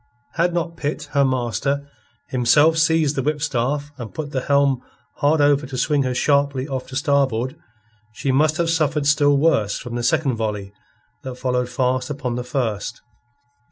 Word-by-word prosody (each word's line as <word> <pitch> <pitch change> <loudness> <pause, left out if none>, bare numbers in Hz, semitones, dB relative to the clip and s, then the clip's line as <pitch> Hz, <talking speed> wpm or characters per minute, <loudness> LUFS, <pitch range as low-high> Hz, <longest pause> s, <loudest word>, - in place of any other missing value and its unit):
Had 170 +2 +1
not 170 -1 -3
Pitt, 145 +1 -4
her 140 -1 +3
master, 135 +2 -1 0.4
himself 135 +6 +4
seized 160 -2 +2
the 135 - 0
whipstaff 145 0 -1
and 115 -3 -6
put 150 -2 -5
the 130 - -1
helm 140 -2 +2 0.4
hard 150 +1 +2
over 145 -1 +3
to 130 -1 -6
swing 145 +3 +1
her 130 -2 -1
sharply 140 0 +1
off 130 -3 -4
to 130 - -9
starboard, 135 -3 +1 0.6
she 130 +5 -2
must 155 +4 +2
have 170 -2 +1
suffered 155 -2 +1
still 145 -1 +4
worse 125 -10 +2
from 120 - -8
the 120 - -2
second 135 0 +1
volley 105 -3 -3 0.5
that 130 -1 -6
followed 125 -1 -1
fast 130 +1 0
upon 135 -4 -3
the 125 +1 -3
first. 120 -3 -3
140 Hz, 165 wpm, -21 LUFS, 125-150 Hz, 0.6 s, himself